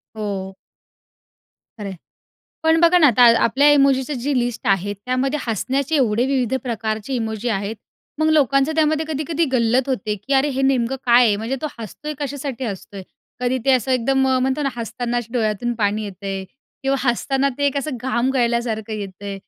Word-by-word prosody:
हो. 195 -3 -4 1.2
खरं 205 - -5
आहे. 190 - -7 0.7
पण 320 +1 +3
बघा 345 +1 +6
ना 305 - +6
आता 245 -1 +5 0.2
आपल्या 275 +6 +4
इमोजीची 275 0 +3
जी 265 +2 -1
लिस्ट 240 0 -3
आहे 195 +1 +1
त्यामध्ये 255 +7 -1
हसण्याचे 260 - -1
एवढे 240 -2 +2
विविध 265 -2 0
प्रकारचे 220 0 -3
इमोजी 225 -1 -2
आहेत. 205 +1 -2 0.4
मग 315 0 +2
लोकांचं 275 0 +3
त्यामध्ये 315 0 +2
कधी-कधी 315 +2 -1
गल्लत 245 +2 +2
होते 215 -5 -1
की 240 +8 -6
अरे 270 +2 +3
हे 270 - 0
नेमकं 265 -1 +1
काय 240 +1 +6
आहे 205 - +2
म्हणजे 230 +6 -3
तो 305 - 0
हसतोय 265 - -7
कशासाठी 275 -2 -4
हसतोय. 195 -2 -6 0.4
कधी 250 +1 0
ते 270 - +3
असं 255 0 +1
एकदम 255 +2 +1 0.2
म्हणतो 265 +3 0
ना 275 - +1
हसताना 240 +1 -3
डोळ्यातून 230 0 0
पाणी 215 -1 0
येतंय 195 0 -5 0.4
किंवा 270 0 +1
हसताना 270 +3 +1
ते 285 - +2
एक 280 - 0
असं 280 -2 -4
घाम 255 0 0
गळल्यासारखं 235 -3 0
येतंय, 200 -1 -6
250 Hz, 165 wpm, -21 LUFS, 220-275 Hz, 1.2 s, बघा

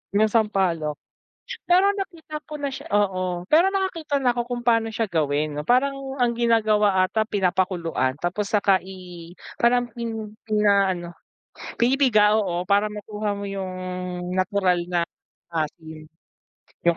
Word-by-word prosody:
'Yung 215 +1 +3
sampalok, 190 -9 +1 0.7
pero 370 +3 +5
nakita 340 -6 -6
ko 305 - -7
na 285 -1 -3
siya 265 - -8
oo 185 -3 0
pero 330 +5 +6
nakakita 330 -7 -1
na 250 - +4
ako 240 0 -1
kung 245 -1 -3
pano 230 -1 +3
siya 225 -1 -1
gawin 150 -2 0
parang 275 +3 +3 0.2
ang 245 - +4
ginagawa 215 -4 +3
ata 215 +4 0
pinapakuluan 180 - 0
tapos 190 +4 -1
saka 200 -2 +4
i, 180 -3 -10 0.3
parang 245 0 +3
pin 225 -2 -5 0.2
pinaano 200 -5 +2 0.7
pinipiga 235 -4 +4
oo 180 -4 -1
para 200 +2 +3
makuha 210 0 -4
mo 200 - -6
'yung 195 -1 -4 0.6
natural 185 -1 +1
na 175 -1 +1 0.5
asim 160 0 -5 0.8
'yung 170 - +3
210 Hz, 130 wpm, -24 LUFS, 180-240 Hz, 0.8 s, pero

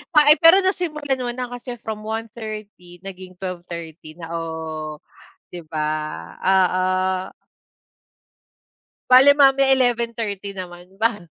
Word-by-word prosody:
Ah, 300 -1 +7
eh, 305 - -6
pero 330 +3 +8
nasimulan 300 -8 -1
mo 245 - -2
na 255 - -3
kasi 245 0 -7
from 215 -1 -5
1:30 215 -5 -7
naging 185 -1 -9
12:30 170 -4 -8
na, 165 -1 -9
o, 165 - -2 1.1
'di 175 -2 -9
ba. 155 -1 -2 0.6
Oo. 185 -1 +3 2.3
Bale 270 +3 +8
mamaya 275 -1 +5
11:30 230 -5 -1
naman 175 -1 -9
ba? 220 -5 0
215 Hz, 110 wpm, -21 LUFS, 180-255 Hz, 2.3 s, pero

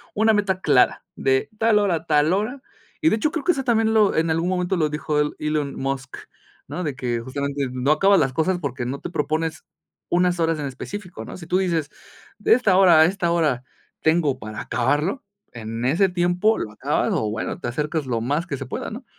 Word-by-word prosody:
una 220 +1 +4
meta 200 -3 +1
clara 135 -7 +3
de 130 0 +1
tal 225 -1 +4
hora 200 -4 +2
a 160 0 -5
tal 150 +2 +3
hora 220 +8 -2 0.4
y 320 - +3
de - - +2
hecho 305 +7 0
creo 315 -3 -3
que 355 - +4
eso 275 -6 -2
también 225 -3 +2
lo 215 -2 +4
en 165 +1 +1
algún 165 +3 0
momento 180 0 0
lo 155 -4 +1
dijo 150 0 -1
el 150 0 0
Elon 150 -2 -2
Musk, 135 -1 -4 0.5
¿no?, 180 - -4
de 145 -5 -3
que 120 -3 -2
justamente 140 +2 -3
no 130 +3 0
acabas 195 +5 +4
las 135 -3 +1
cosas 175 +6 +1
porque 135 -6 -4
no 135 +3 -4
te - - -6
propones 155 0 -2 0.5
unas 180 0 +2
horas 165 -1 +1
en 145 - -3
específico, 180 +7 -7
¿no?, - - -8
si 175 - -10
tú 180 - +2
dices 165 -6 0 0.5
de 210 - +3
esta 225 -6 +3
hora 180 -4 +7
a 160 - +8
esta 175 -1 0
hora 150 -7 +1 0.4
tengo 160 -4 +2
para 110 -2 -7
acabarlo 145 - 0 0.3
en 115 +1 -5
ese 170 +9 +3
tiempo 180 +4 +2
lo 105 - -4
acabas - - 0
o 110 - 0
bueno, 110 - -4
te - - -3
acercas 150 +4 -2
lo 120 -2 -1
más 145 +8 -1
que 140 - -4
se - - -6
pueda, - - -5
¿no? - - -8
160 Hz, 215 wpm, -23 LUFS, 140-190 Hz, 0.5 s, a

